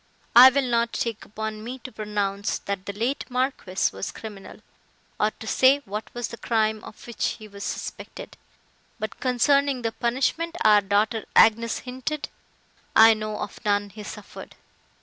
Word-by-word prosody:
I 250 +2 +11
will 275 +1 +1
not 235 -1 +1
take 230 -2 -3
upon 215 0 -5
me 245 +3 -6
to 255 0 -10
pronounce, 205 -2 -2
that 200 -1 -5
the 200 - -3
late 235 +7 -1
Marquis 250 -7 -1
was 95 - -4
criminal, 205 -4 -10 0.6
or 210 - +3
to 220 - -12
say 265 +5 +4
what 210 +2 -6
was 240 -1 -3
the 235 - -8
crime 220 -2 0
of - - -12
which 235 - -6
he 215 - -11
was 200 -1 -9
suspected; - - -6 0.6
but, 215 - -6
concerning 270 +1 +2
the 225 - 0
punishment 270 +9 -1
our 210 -1 +6
daughter 210 +3 0
Agnes 230 +1 +5
hinted, 260 +4 -4 0.7
I 225 0 +9
know 215 -1 -4
of 205 - -7
none 205 -1 0
he 215 - -10
suffered. 210 0 -10
220 Hz, 160 wpm, -25 LUFS, 210-250 Hz, 0.7 s, I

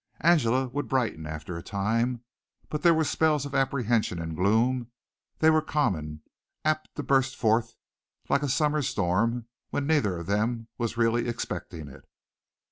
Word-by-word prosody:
Angela 130 -6 +3
would 145 +3 -3
brighten 110 - -1
after 80 +2 -6
a 85 - -5
time, 115 +6 -1 0.5
but 150 - -3
there 170 - +6
were 160 - +2
spells 150 -2 +1
of 140 - -7
apprehension 120 -8 +1
and 80 -1 -4
gloom; 115 +6 +2 0.5
they 160 0 +5
were 155 0 +4
common, 80 - -1 0.4
apt 155 0 0
to 145 - -4
burst 135 -1 +2
forth 115 0 +1 0.5
like 140 - +2
a 145 - -1
summer 150 +2 +2
storm 115 +2 0 0.2
when 145 - -2
neither 140 - +2
of 85 - -6
them 110 +4 -1
was 115 -1 -2
really 120 +1 +2
expecting 90 -8 -5
it. 65 - -13
120 Hz, 155 wpm, -27 LUFS, 100-140 Hz, 0.5 s, there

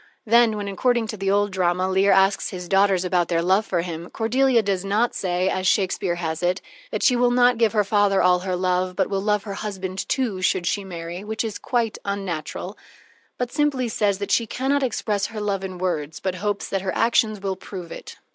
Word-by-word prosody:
Then, 230 -1 +4
when, 205 -1 -4
according 235 +4 +1
to 215 - -3
the 195 0 -1
old 205 +1 +2
drama, 185 0 +1
Leir 190 +1 +3
asks 195 +1 +3
his 180 -1 -7
daughters 195 -1 +3
about 180 -2 +1
their 170 -1 0
love 190 +4 +2
for 175 -3 0
him, 170 0 -6
Cordelia 240 +1 +2
does 195 -2 -1
not 210 +5 +1
say, 180 0 -1
as 185 -1 0
Shakespeare 190 -2 +1
has 160 -1 -3
it, 180 +1 +1 0.3
that - - -3
she 255 - +5
will 245 0 +3
not 245 -1 +3
give 225 -2 +3
her 210 -2 +3
father 205 -1 +2
all 180 0 +4
her 185 0 -2
love, 180 0 0
but - - 0
will 195 -1 0
love 210 0 +1
her 200 - -5
husband, 195 -2 -5
too, 230 -8 -1
should 185 -1 +1
she 200 +3 0
marry 175 0 -7
which 220 +2 -3
is 220 -2 -4
quite 235 -4 -1
unnatural 195 -6 -4 0.6
but 245 -1 -3
simply 290 -4 +1
says 205 -3 0
that 200 0 -4
she 230 - +2
can 260 +5 -2
not 285 0 +2
express 215 -5 -1
her 220 -1 -7
love 200 -2 -2
in 185 -1 -5
words, 160 -4 -2
but 190 -1 -2
hopes 200 +2 -2
that 195 - -2
her 185 -1 -3
actions 225 -2 +2
will 195 -1 -2
prove 180 -3 -9
it. - - -9
195 Hz, 220 wpm, -23 LUFS, 185-220 Hz, 0.6 s, she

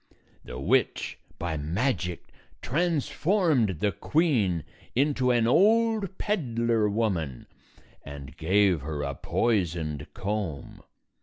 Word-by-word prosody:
The 60 - -8
witch, - - 0 0.2
by 85 -2 -3
magic, 90 - -2 0.3
transformed 155 - +1
the 105 - +2
queen 105 - +1 0.3
into 135 -1 +2
an 120 -2 +3
old 215 - +3
peddler 115 - 0
woman 95 - -1 0.6
and 70 -2 -9
gave 95 -1 +2
her 75 0 -4
a 70 0 -2
poisoned 85 - -1
comb. 95 -6 -4
105 Hz, 95 wpm, -27 LUFS, -, 0.6 s, an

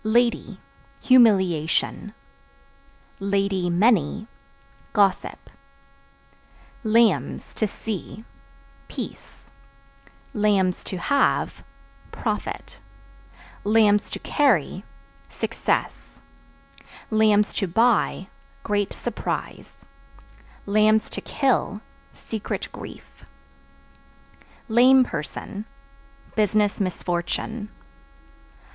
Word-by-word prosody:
Lady 235 +2 +1 0.4
Humiliation; 200 - +3 1.0
(many) 195 0 +1 0.7
gossip. 200 -2 +1 1.4
Lambs 215 - +2
(To 215 - 0
see) 215 +1 -6 0.6
peace; - - -9 0.8
(to 195 -3 +1
have) 280 +10 +1 0.5
profit; - - -4 0.8
(to 210 -1 +3
carry) 200 - +1 0.5
success; - - -3 0.9
(to 210 -2 +3
buy) 225 -1 +2 0.4
great 205 -2 -1
surprise; 240 -2 -5 0.9
(to 215 +1 +2
kill) 245 -6 0 0.3
secret 220 -2 -5
grief. - - -11 1.4
Lame 255 +3 +6
Person 205 +2 -6 0.7
Business 210 -1 +2
misfortune. 185 +4 -3
210 Hz, 55 wpm, -24 LUFS, 190-225 Hz, 1.4 s, Lame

